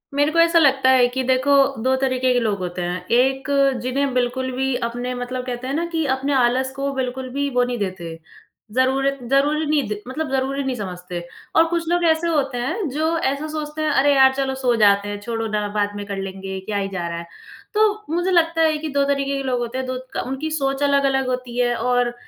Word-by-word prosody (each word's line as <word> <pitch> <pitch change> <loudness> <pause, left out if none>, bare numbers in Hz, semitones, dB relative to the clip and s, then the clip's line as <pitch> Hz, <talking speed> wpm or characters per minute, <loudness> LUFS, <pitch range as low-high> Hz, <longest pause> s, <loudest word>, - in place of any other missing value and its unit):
मेरे 290 +2 +2
को 335 - +1
ऐसा 335 0 +5
लगता 270 -3 +4
है 250 -2 +5
कि 260 - 0
देखो 260 +2 +3 0.3
2 260 +1 +3
तरीके 255 -1 +1
के 245 - +3
लोग 215 -4 0
होते 180 0 -4
हैं। 175 +1 -3
1 265 +3 +2 0.3
जिन्हें 265 +2 -1
बिल्कुल 255 +1 -1
भी 265 0 0
अपने 245 +1 -4
मतलब 250 +1 -4
कहते 250 0 -5
हैं 270 - -2
ना 330 +4 0
कि 320 -2 0
अपने 275 +2 -2
आलस 260 0 +2
को 275 0 -2
बिल्कुल 260 0 -3
भी 285 0 0
वो 245 - +4
नहीं 245 0 -2
देते, 185 -4 -4 0.6
ज़रूरत 270 +3 +1
ज़रूरी 290 +3 +2
नहीं 295 -5 +1
द 210 - -2
मतलब 295 +3 -3
ज़रूरी 270 +1 -1
नहीं 265 -1 -2
समझते 180 -4 -6 0.3
और 325 - +6
कुछ 340 -1 -1
लोग 350 0 +1
ऐसे 320 +1 +1
होते 280 -6 0
हैं, 280 - -2
जो 315 +4 0
ऐसा 280 0 -1
सोचते 305 0 -4
हैं 310 - +1
अरे! 285 +2 +4
यार 265 -1 +6
चलो 265 0 -1
सो 245 -2 +2
जाते 200 0 +4
हैं, 205 0 -4
छोड़ो 225 0 -3
ना 210 -1 -1
बाद 205 -1 0
में 205 0 -5
कर 200 -1 -5
लेंगे, 195 0 -5
क्या 210 -1 -2
ही 195 -1 -1
जा 180 -3 -4
रहा 170 0 -4
है? 170 - -8 0.5
तो 425 0 +2
मुझे 350 +2 0
लगता 330 -2 +3
है 315 -1 +3
कि 310 +1 -5
2 - - +4
तरीके 275 0 -2
के 275 - -3
लोग 255 -2 -1
होते 240 +1 -4
हैं 260 0 -3
2 255 0 -3 0.2
क - - -2
उनकी 270 +4 -3
सोच 275 -2 -1
अलग-अलग 275 -2 +2
होती 250 -1 -3
है 240 -1 +2
और 245 +1 +1
260 Hz, 230 wpm, -21 LUFS, 240-285 Hz, 0.6 s, और